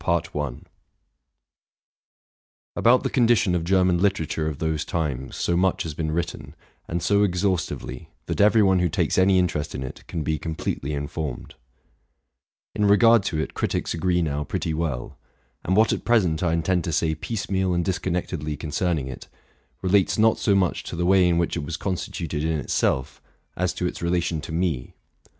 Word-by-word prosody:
Axnovt 75 Hz, -6 st, -2 dB, 2.4 s
the -, -, 0 dB
condition 120 Hz, -7 st, +3 dB
of 85 Hz, -2 st, 0 dB
German 90 Hz, 0 st, +3 dB
literature 85 Hz, -5 st, 0 dB
of 75 Hz, -3 st, -3 dB
those 80 Hz, -1 st, -1 dB
times 70 Hz, -6 st, -3 dB
so 85 Hz, -, 0 dB
much 95 Hz, +1 st, +1 dB
has 80 Hz, -, -5 dB
been 80 Hz, +1 st, -3 dB
written, 85 Hz, +2 st, -4 dB, 0.3 s
and 85 Hz, 0 st, -3 dB
so 100 Hz, +4 st, +3 dB
exhaustively, 90 Hz, -9 st, -1 dB, 0.2 s
that -, -, -1 dB
every 105 Hz, +1 st, +5 dB
one 95 Hz, -2 st, +4 dB
who 90 Hz, -1 st, +2 dB
takes 80 Hz, -, +1 dB
any 95 Hz, 0 st, +4 dB
interest 85 Hz, -5 st, 0 dB
in 65 Hz, -, -4 dB
it 65 Hz, -, -8 dB
can 80 Hz, -3 st, -3 dB
be 80 Hz, 0 st, -1 dB
completely 80 Hz, -2 st, -3 dB
informed; 70 Hz, -2 st, -5 dB, 1.2 s
in 105 Hz, -, +1 dB
regard 115 Hz, +3 st, +6 dB
to 80 Hz, -, -1 dB
it 80 Hz, -, -3 dB
critics -, -, -1 dB
agree 90 Hz, +1 st, +1 dB
now 75 Hz, -2 st, -1 dB
pretty 80 Hz, +2 st, -3 dB
well; 75 Hz, -6 st, -3 dB, 0.4 s
and 95 Hz, -, +1 dB
what 110 Hz, +1 st, +4 dB
at -, -, -3 dB
present 95 Hz, -10 st, +2 dB
I 85 Hz, -3 st, +1 dB
intend 85 Hz, +1 st, +1 dB
to 85 Hz, -, -2 dB
say 80 Hz, +1 st, +1 dB
piecemeal 95 Hz, +1 st, -2 dB
and 85 Hz, -1 st, 0 dB
disconnectedly 90 Hz, -5 st, -2 dB
con 75 Hz, -, -6 dB
cerning 80 Hz, -1 st, 0 dB
it, 65 Hz, -2 st, -8 dB, 0.6 s
relates 95 Hz, 0 st, +3 dB
not 110 Hz, 0 st, +4 dB
so 100 Hz, -, +2 dB
much 95 Hz, -4 st, +1 dB
to -, -, -6 dB
the 85 Hz, +1 st, -1 dB
way 95 Hz, -1 st, +5 dB
in 85 Hz, -, +2 dB
which 85 Hz, -1 st, 0 dB
it 80 Hz, -, -3 dB
was 80 Hz, +2 st, -4 dB
constituted 85 Hz, -5 st, -3 dB
in 80 Hz, 0 st, 0 dB
itself, 65 Hz, -2 st, -1 dB, 0.3 s
as 90 Hz, 0 st, 0 dB
to 90 Hz, -, -3 dB
its 90 Hz, -, -3 dB
relation 85 Hz, -2 st, 0 dB
to 80 Hz, -, -8 dB
me. 80 Hz, -7 st, -2 dB
85 Hz, 170 wpm, -24 LUFS, 80-95 Hz, 2.4 s, regard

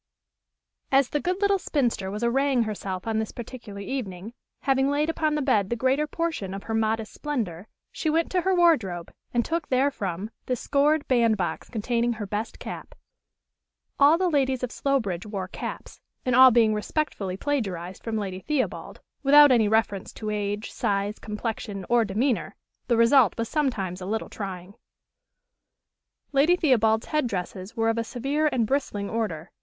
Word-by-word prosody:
As 270 Hz, -1 st, +4 dB
the 295 Hz, -, 0 dB
good 365 Hz, +4 st, -1 dB
little 400 Hz, -1 st, +3 dB
spinster 245 Hz, -, -1 dB
was 210 Hz, +4 st, -4 dB
arraying 260 Hz, +1 st, +2 dB
herself 195 Hz, -4 st, -4 dB
on 220 Hz, -1 st, 0 dB
this 220 Hz, -, -3 dB
particular 230 Hz, -4 st, -8 dB
evening, 200 Hz, -3 st, -5 dB, 0.3 s
having 270 Hz, 0 st, +2 dB
laid 295 Hz, +3 st, +1 dB
upon 310 Hz, -2 st, 0 dB
the 300 Hz, -, 0 dB
bed 210 Hz, -8 st, +2 dB
the 235 Hz, -, 0 dB
greater 260 Hz, +5 st, +1 dB
portion 310 Hz, -, -3 dB
of 195 Hz, -, -7 dB
her 225 Hz, -, -4 dB
modest 220 Hz, 0 st, 0 dB
splendor, 220 Hz, -, -4 dB, 0.2 s
she 315 Hz, -, -2 dB
went 325 Hz, +2 st, +1 dB
to 365 Hz, -, +2 dB
her 375 Hz, +1 st, +1 dB
wardrobe, 225 Hz, -, +2 dB, 0.2 s
and 240 Hz, -1 st, +1 dB
took 330 Hz, -2 st, -2 dB
therefrom 220 Hz, -7 st, -1 dB, 0.2 s
the 255 Hz, -, +1 dB
scored 285 Hz, +4 st, +1 dB
bandbox 230 Hz, -7 st, +1 dB
containing 235 Hz, +1 st, 0 dB
her 210 Hz, -2 st, -5 dB
best 210 Hz, +3 st, -4 dB
cap. -, -, -8 dB, 1.0 s
All 290 Hz, +4 st, +6 dB
the 370 Hz, +1 st, +1 dB
ladies 265 Hz, -5 st, +1 dB
of 250 Hz, -, -2 dB
Slowbridge 220 Hz, -10 st, -1 dB
wore 195 Hz, -3 st, -4 dB
caps; -, -, -7 dB, 0.2 s
and 255 Hz, -1 st, +2 dB
all 260 Hz, +1 st, +9 dB
being 225 Hz, -3 st, +4 dB
respectfully 210 Hz, -4 st, -2 dB
plagiarized 190 Hz, -, -3 dB
from 225 Hz, -1 st, -2 dB
Lady 190 Hz, -3 st, -4 dB
Theobald, 290 Hz, +5 st, -3 dB, 0.2 s
without 290 Hz, 0 st, +7 dB
any 230 Hz, -4 st, +4 dB
reference 205 Hz, -3 st, 0 dB
to 215 Hz, -1 st, -4 dB
age, 205 Hz, 0 st, -3 dB
size, 200 Hz, +1 st, -1 dB
complexion, 210 Hz, -3 st, -5 dB
or 235 Hz, -1 st, +4 dB
demeanor, 225 Hz, +5 st, -1 dB, 0.3 s
the 235 Hz, -, +2 dB
result 230 Hz, -1 st, +5 dB
was 230 Hz, 0 st, -1 dB
sometimes 205 Hz, -, -1 dB
a 185 Hz, -, -5 dB
little 220 Hz, +2 st, -2 dB
trying. 190 Hz, -2 st, -7 dB, 1.6 s
Lady 295 Hz, +5 st, +4 dB
Theobald's 225 Hz, -9 st, +2 dB
head 300 Hz, -5 st, 0 dB
dresses 190 Hz, +1 st, -5 dB
were 225 Hz, 0 st, +2 dB
of 225 Hz, 0 st, 0 dB
a -, -, 0 dB
severe 275 Hz, +6 st, -1 dB
and 235 Hz, -3 st, +1 dB
bristling 215 Hz, -6 st, -1 dB
order. 195 Hz, -8 st, -3 dB
230 Hz, 165 wpm, -26 LUFS, 205-275 Hz, 1.6 s, all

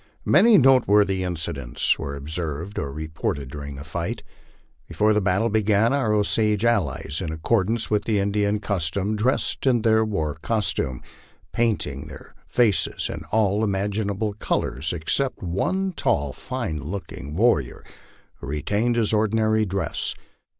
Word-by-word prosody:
Many 230 Hz, -2 st, +6 dB
noteworthy 105 Hz, -, +4 dB
incidents 80 Hz, -8 st, -1 dB
were 70 Hz, 0 st, -4 dB
observed 80 Hz, +5 st, -4 dB
or 70 Hz, -, -3 dB
reported 75 Hz, -3 st, -4 dB
during 70 Hz, -1 st, -7 dB
the 70 Hz, -, -8 dB
fight. 85 Hz, +2 st, -4 dB, 0.6 s
Before 110 Hz, +1 st, +2 dB
the 105 Hz, -, +2 dB
battle 100 Hz, +4 st, +1 dB
began, 110 Hz, +2 st, +3 dB
our 130 Hz, -6 st, +1 dB
Osage 105 Hz, +1 st, +1 dB
allies, 100 Hz, -9 st, 0 dB
in 80 Hz, -, -3 dB
accordance 105 Hz, +8 st, 0 dB
with 105 Hz, -1 st, +1 dB
the 110 Hz, -2 st, +1 dB
Indian 100 Hz, +1 st, +1 dB
cus 95 Hz, -6 st, -1 dB
tom, 100 Hz, +5 st, -1 dB
dressed 125 Hz, +5 st, 0 dB
in 120 Hz, -4 st, +3 dB
their 110 Hz, -1 st, +4 dB
war 80 Hz, -9 st, -1 dB
costume, 105 Hz, -, -1 dB, 0.5 s
painting 100 Hz, -12 st, -1 dB
their -, -, -12 dB
faces 115 Hz, -6 st, +1 dB
in -, -, -8 dB
all 105 Hz, -1 st, +2 dB
imaginable 100 Hz, +1 st, -1 dB
col 105 Hz, -, -1 dB
ors, 70 Hz, +5 st, -3 dB
except 90 Hz, -, -1 dB
one 185 Hz, -, -1 dB
tall, 70 Hz, -, 0 dB
fine 80 Hz, -1 st, -4 dB
looking 75 Hz, -3 st, -6 dB
warrior, 95 Hz, -, +1 dB, 0.5 s
who 70 Hz, -, -9 dB
retained 105 Hz, -, 0 dB
his 115 Hz, -2 st, +1 dB
ordinary 110 Hz, 0 st, +2 dB
dress. 95 Hz, +1 st, -2 dB
100 Hz, 140 wpm, -24 LUFS, 80-110 Hz, 0.6 s, Many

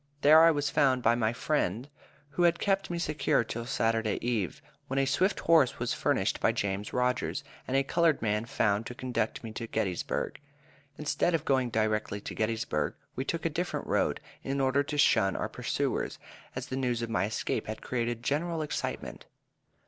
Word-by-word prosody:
There 155 Hz, +2 st, +8 dB
I 165 Hz, -, +8 dB
was 145 Hz, -3 st, 0 dB
found 130 Hz, -3 st, +3 dB
by 115 Hz, -, +5 dB
my 115 Hz, -2 st, +1 dB
friend, 120 Hz, -, -1 dB, 0.4 s
who 175 Hz, +3 st, +4 dB
kept 195 Hz, +3 st, 0 dB
me 175 Hz, -, -2 dB
secure 155 Hz, -7 st, +1 dB
till 115 Hz, +1 st, -5 dB
Saturday 115 Hz, -3 st, +1 dB
eve, 110 Hz, -8 st, -1 dB, 0.3 s
when 135 Hz, -, -3 dB
a 135 Hz, -, +3 dB
swift 185 Hz, +9 st, +1 dB
horse 160 Hz, -6 st, +4 dB
was -, -, -1 dB
furnished -, -, 0 dB
by -, -, +3 dB
James 100 Hz, +1 st, -2 dB
Rogers, 125 Hz, +1 st, 0 dB, 0.2 s
and 130 Hz, -, +1 dB
a 135 Hz, -, +3 dB
colored 165 Hz, +2 st, +2 dB
man 105 Hz, 0 st, 0 dB
found 110 Hz, -4 st, 0 dB
to 125 Hz, -, -7 dB
conduct 120 Hz, -4 st, -2 dB
me 115 Hz, -, -6 dB
to 115 Hz, +1 st, -5 dB
Gettysburg. 100 Hz, -6 st, -2 dB, 0.6 s
Instead 150 Hz, +3 st, +1 dB
of 160 Hz, -, -2 dB
going 130 Hz, -2 st, +2 dB
direct 110 Hz, -2 st, -1 dB
to -, -, -4 dB
Gettysburg, 110 Hz, -9 st, -1 dB, 0.2 s
we 130 Hz, -, -2 dB
took 165 Hz, +4 st, -3 dB
a -, -, +3 dB
different 175 Hz, +4 st, -2 dB
road, -, -, +1 dB, 0.2 s
in 135 Hz, +1 st, -2 dB
order 135 Hz, +1 st, +3 dB
to 145 Hz, +1 st, -4 dB
shun 95 Hz, -9 st, +4 dB
our -, -, -1 dB
pursuers, -, -, -2 dB, 0.4 s
as -, -, -4 dB
the 130 Hz, -, -5 dB
news 125 Hz, -3 st, 0 dB
of 115 Hz, -, -3 dB
my 95 Hz, -4 st, +1 dB
escape 110 Hz, -, -2 dB
had 110 Hz, 0 st, -6 dB
created 120 Hz, -1 st, -2 dB
general 160 Hz, +4 st, 0 dB
excitement. 150 Hz, -, -4 dB
125 Hz, 180 wpm, -29 LUFS, 110-145 Hz, 0.6 s, There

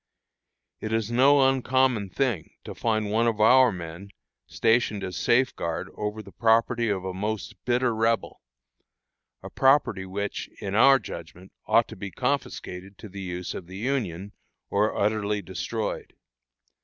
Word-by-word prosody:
It 110 Hz, -, -5 dB
is 110 Hz, 0 st, -1 dB
no 135 Hz, +3 st, +5 dB
uncommon 130 Hz, -5 st, +1 dB
thing 120 Hz, -, -2 dB
to -, -, -7 dB
find 110 Hz, -2 st, -1 dB
one 115 Hz, +2 st, +2 dB
of 110 Hz, -2 st, 0 dB
our 125 Hz, +3 st, +6 dB
men 85 Hz, +2 st, -8 dB, 0.4 s
stationed 110 Hz, -3 st, +1 dB
as 90 Hz, -1 st, -5 dB
safeguard 120 Hz, -10 st, 0 dB
over 105 Hz, +1 st, -4 dB
the 100 Hz, -, -13 dB
property 115 Hz, +1 st, +2 dB
of 95 Hz, -2 st, -2 dB
a 95 Hz, -, -3 dB
most 105 Hz, +3 st, -3 dB
bitter 125 Hz, 0 st, +2 dB
Rebel 115 Hz, +1 st, 0 dB, 1.1 s
property 130 Hz, -8 st, +3 dB
which, 100 Hz, +2 st, -4 dB
in 100 Hz, -1 st, -4 dB
our 135 Hz, +6 st, +7 dB
judgment, 95 Hz, -4 st, -10 dB, 0.2 s
ought -, -, +4 dB
to -, -, -9 dB
be 100 Hz, +1 st, -6 dB
confiscated 100 Hz, -6 st, -3 dB
to 110 Hz, -, -10 dB
the 100 Hz, +1 st, -8 dB
use 90 Hz, -1 st, -5 dB
of 85 Hz, -, -8 dB
the 95 Hz, +1 st, -9 dB
Union, 105 Hz, -6 st, -2 dB, 0.4 s
or 105 Hz, +2 st, +1 dB
utterly 105 Hz, 0 st, 0 dB
destroyed. 105 Hz, +3 st, -4 dB
110 Hz, 145 wpm, -26 LUFS, 95-120 Hz, 1.1 s, our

